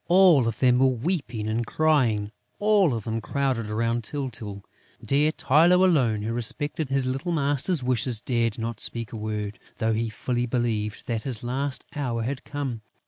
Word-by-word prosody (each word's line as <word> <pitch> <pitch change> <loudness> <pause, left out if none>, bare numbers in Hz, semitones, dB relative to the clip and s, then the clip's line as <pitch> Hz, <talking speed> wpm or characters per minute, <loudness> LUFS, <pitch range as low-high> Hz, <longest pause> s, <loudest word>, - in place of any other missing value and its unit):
All 175 -8 +6
of 115 - -2
them 125 -1 +4
were 135 - +5
weeping 125 - -2
and 110 +2 0
crying, 120 -9 +1 0.3
all 205 - +3
of 110 - -4
them 115 +1 -3
crowded 130 -5 -1
round 115 +2 0
Tyltyl. 110 -7 -5 0.4
Dear 150 +3 +3
Tylô 170 +6 +4
alone, 120 - +2
who 115 +2 -2
respected 130 +5 -2
his 135 -1 +2
little 135 +7 -2
master's 145 0 +1
wishes, 125 -2 0
dared 115 -2 0
not 115 -1 -4
speak 115 -1 -3
a - - -4
word, 105 -1 -4 0.2
though 115 -1 +1
he 115 +1 -1
fully 120 +3 -2
believed 110 -3 -2
that 115 -2 -2
his 120 -4 -3
last 130 +3 -2
hour 120 -6 -2
had 130 +3 -3
come. 135 -6 -4
125 Hz, 170 wpm, -25 LUFS, 115-140 Hz, 0.4 s, All